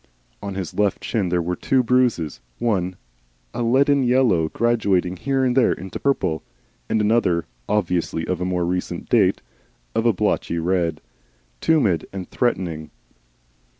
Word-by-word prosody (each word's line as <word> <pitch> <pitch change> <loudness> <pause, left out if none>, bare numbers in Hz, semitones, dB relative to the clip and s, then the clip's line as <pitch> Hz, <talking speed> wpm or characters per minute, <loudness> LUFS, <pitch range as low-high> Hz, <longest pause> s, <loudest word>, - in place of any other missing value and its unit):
On 100 -2 -5
his 95 -4 -4
left 105 -2 0
shin 105 -6 -1
there 90 -1 +1
were 90 +2 -2
two 130 +5 +1
bruises, 115 - +1 0.2
one 95 -6 0 0.6
a - - -3
leaden 135 +4 +3
yellow 120 -11 +3
graduating 100 -6 +1
here 135 +5 0
and 125 -1 +1
there 130 -3 +4
into 95 +1 -7
purple, 135 - 0 0.5
and 110 - +1
another, 105 -6 +2 0.2
obviously 90 -5 0
of 90 -2 -2
more 90 -1 0
recent 90 +1 -3
date, - - +3 0.5
of 115 - +1
a - - +6
blotchy 90 -3 -1
red 85 -2 0 0.6
tumid 110 - +2
and 95 -2 -6
threatening. 85 -10 -1
95 Hz, 140 wpm, -22 LUFS, 90-120 Hz, 0.6 s, a